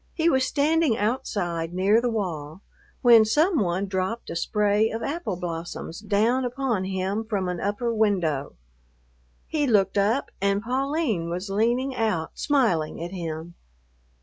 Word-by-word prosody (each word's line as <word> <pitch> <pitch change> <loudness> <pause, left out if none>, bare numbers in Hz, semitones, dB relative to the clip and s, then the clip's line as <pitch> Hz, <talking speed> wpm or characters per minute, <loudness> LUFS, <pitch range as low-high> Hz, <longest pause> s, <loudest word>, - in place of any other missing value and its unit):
He 335 0 +3
was 260 -2 +2
standing 300 -4 +2
outside 185 -7 -2
near 200 +5 +3
the 245 - 0
wall, 175 -6 -4 0.4
when 235 -3 +8
some 305 - +2
one 185 0 0
dropped 190 +4 -3
a - - -5
spray 210 +4 +2
of 225 +1 -4
apple 290 - -3
blossoms 170 -1 -5
down 215 +5 +1
upon 245 -5 -1
him 190 +3 -2
from 205 -4 -2
an 180 -1 -3
upper 220 +4 -1
window. 180 -10 0 0.9
He 295 -3 -1
looked 200 -4 +3
up 220 +7 +1
and 200 +1 +1
Pauline 260 - -1
was 180 +3 -4
leaning 240 +6 +1
out 215 -9 -1
smiling 230 - +1
at 170 +1 -5
him. 165 -2 -5
210 Hz, 145 wpm, -25 LUFS, 180-245 Hz, 0.9 s, when